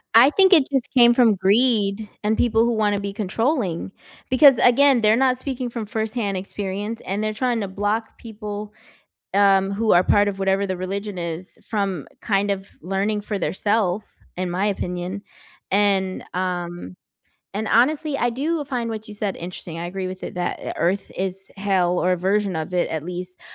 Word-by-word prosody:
I 240 +4 +8
think 380 +2 +5
it 300 -6 +6
just 265 -3 0
came 240 -2 +6
from 235 -4 +4
greed 205 +1 +2
and 215 +1 +1
people 230 -1 +3
who 235 - +1
wanna 210 -2 +1
be 200 0 -4
controlling. 210 - -1 0.4
Because, 265 0 +7
again, 265 +1 +5
they're 215 0 +4
not 255 +1 +2
speaking 255 -1 -4
from 230 -2 -5
firsthand 220 -2 -2
experience, 200 +3 -4
and 200 +3 -2
they're 215 0 -1
trying 240 0 0
to 200 - -2
block 205 +4 -2
people, 210 -2 -7 0.6
um, 195 -1 +4
who 215 +2 +1
are 175 +1 +5
part 205 +2 +4
of 195 - -4
whatever 195 +1 +1
the 185 -1 -3
religion 195 +2 -4
is 170 +2 -6
from 195 -7 -2
kind 200 -1 0
of 195 0 -3
learning 195 +4 -1
for 205 0 -3
their - - -1
self, 205 -1 -1 0.2
in 180 0 -2
my 185 +3 0
opinion. 185 -1 -3 0.5
And 195 -1 +1
um, 175 - -4 0.6
and 215 +2 -3
honestly, 285 +4 +2
I 240 -2 +1
do 295 +4 -2
find 245 -4 -3
what 220 -1 -6
you 210 - -9
said 205 -2 -3
interesting. 170 -1 -7
I 170 - -4
agree 185 +1 -4
with 185 0 -8
it - - -5
that 180 0 -3
earth 185 +4 0
is 190 0 -2 0.2
hell 190 -3 +1
or 180 - +2
a 180 - +1
version 195 +2 0
of 160 +3 -4
it 175 - +1
at 160 -1 -4
least, 180 +1 -6
205 Hz, 185 wpm, -22 LUFS, 185-230 Hz, 0.6 s, I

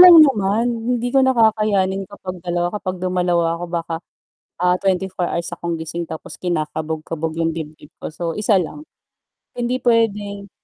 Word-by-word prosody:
lang 360 -1 +11
naman, 220 -5 +3 0.3
hindi 240 +1 -1
ko 270 - +5
na 260 - +4
kakayanin 205 -4 +2
kapag 185 -2 -7
2 175 0 0
kapag 185 -3 -3
dumalawa 175 -2 +1
ako 175 - -4
baka, 170 -1 -2 0.7
ah, 180 0 +4
24 190 -2 0
hours 170 0 -2
akong 170 0 -3
gising 170 +2 -4
tapos 160 - -7
kinakabog-kabog 160 -1 -2
'yung 165 0 +1
dibdib 155 -2 -8
ko, - - -4
so 165 +1 -3
1 210 -1 +3
lang, 180 - -5 0.7
hindi 245 +1 0
puwedeng 205 -4 +1
185 Hz, 150 wpm, -21 LUFS, 170-210 Hz, 0.7 s, lang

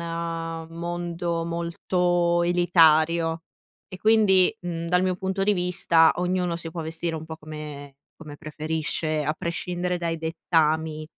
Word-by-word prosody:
a 165 -1 -4
mondo 170 0 -3
molto 170 +1 0
elitario 165 -1 +3 0.5
e 185 - -9
quindi, 215 -2 +4
mhmm, 170 -1 -5
dal 180 +1 +2
mio 185 -1 +1
punto 190 +1 -2
di 205 +1 +3
vista 175 -3 +3
ognuno 180 -1 -1
si 165 -1 -6
può 165 - -5
vestire 165 +1 -2
un 160 - -7
po' 160 0 -7
come 150 -3 -9 0.2
come 150 -2 -11
preferisce 155 0 -2
a 155 - 0
prescindere 175 +2 -3
dai 170 -1 -2
dettami 160 -1 0
170 Hz, 135 wpm, -25 LUFS, 160-175 Hz, 0.5 s, quindi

